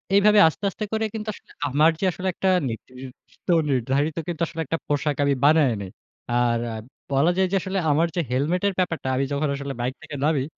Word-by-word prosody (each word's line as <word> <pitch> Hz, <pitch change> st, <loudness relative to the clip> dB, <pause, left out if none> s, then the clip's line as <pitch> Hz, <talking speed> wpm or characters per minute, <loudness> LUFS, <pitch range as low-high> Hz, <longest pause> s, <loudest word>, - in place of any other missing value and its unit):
এইভাবে 210 Hz, +1 st, +6 dB
আস্তে, 160 Hz, -, -4 dB
আস্তে 215 Hz, +3 st, -5 dB
করে 220 Hz, 0 st, +1 dB
কিন্তু 215 Hz, 0 st, -5 dB
আসলে -, -, -17 dB, 0.2 s
আমার 150 Hz, +4 st, +4 dB
যে, 195 Hz, -, 0 dB
আসলে 185 Hz, +3 st, -5 dB
একটা 190 Hz, -, 0 dB, 0.2 s
নির্দিষ্ট, 125 Hz, +3 st, -11 dB, 0.2 s
নির্ধারিত 135 Hz, +5 st, 0 dB
কিন্তু, 170 Hz, -1 st, -4 dB
আসলে 165 Hz, 0 st, -5 dB
একটা 165 Hz, +5 st, -1 dB
পোশাক 145 Hz, 0 st, 0 dB
আমি 140 Hz, 0 st, +3 dB
বানায় 150 Hz, -5 st, +5 dB
নেই। 95 Hz, -, -7 dB, 0.4 s
আর 120 Hz, -1 st, +2 dB
আ -, -, -5 dB, 0.4 s
বলা 140 Hz, +6 st, +3 dB
যায় 190 Hz, -1 st, +3 dB
যে, -, -, +1 dB
আসলে 195 Hz, +1 st, -3 dB
আমার 165 Hz, +4 st, +3 dB
যে 175 Hz, -, +1 dB
হেলমেট 150 Hz, +8 st, 0 dB
এর 200 Hz, -, 0 dB
ব্যাপারটা, 165 Hz, -6 st, -1 dB
আমি 135 Hz, -, +1 dB
যখন 145 Hz, +1 st, 0 dB
আসলে 140 Hz, 0 st, -5 dB
বাইক 125 Hz, +2 st, -1 dB
থেকে 155 Hz, -2 st, -8 dB
নামি, 150 Hz, -4 st, +2 dB
150 Hz, 205 wpm, -24 LUFS, 135-180 Hz, 0.4 s, এইভাবে